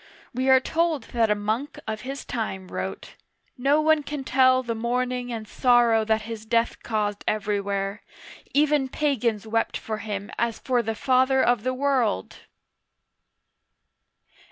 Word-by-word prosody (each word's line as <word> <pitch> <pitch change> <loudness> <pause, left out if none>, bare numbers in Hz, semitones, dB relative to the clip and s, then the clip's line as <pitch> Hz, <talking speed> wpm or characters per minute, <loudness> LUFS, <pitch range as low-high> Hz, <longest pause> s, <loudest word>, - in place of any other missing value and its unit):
We 260 +2 0
are 260 0 +7
told 320 -1 0
that 230 -2 +2
a 210 - +3
monk 215 +7 -3
of 215 -1 -3
his 270 +2 -6
time 190 -5 -4
wrote: - - -5 0.2
" - - -43
No 275 +4 +2
one 315 0 +4
can 290 -1 -5
tell 260 0 +4
the 235 -2 -2
mourning 245 +2 -2
and 220 -2 -5
sorrow 240 -3 +3
that 220 0 +1
his 225 -1 -7
death 230 +1 0
caused 210 -2 -2
everywhere; 200 -1 -1 0.5
even 290 -2 +2
pagans 240 -8 0
wept 225 +1 0
for 215 -1 -5
him 205 -2 -5
as 235 -1 0
for 250 -2 0
the 225 -1 -3
father 260 +3 +3
of 245 -3 +2
the 255 +3 -1
world 255 - 0
235 Hz, 150 wpm, -25 LUFS, 215-260 Hz, 0.5 s, are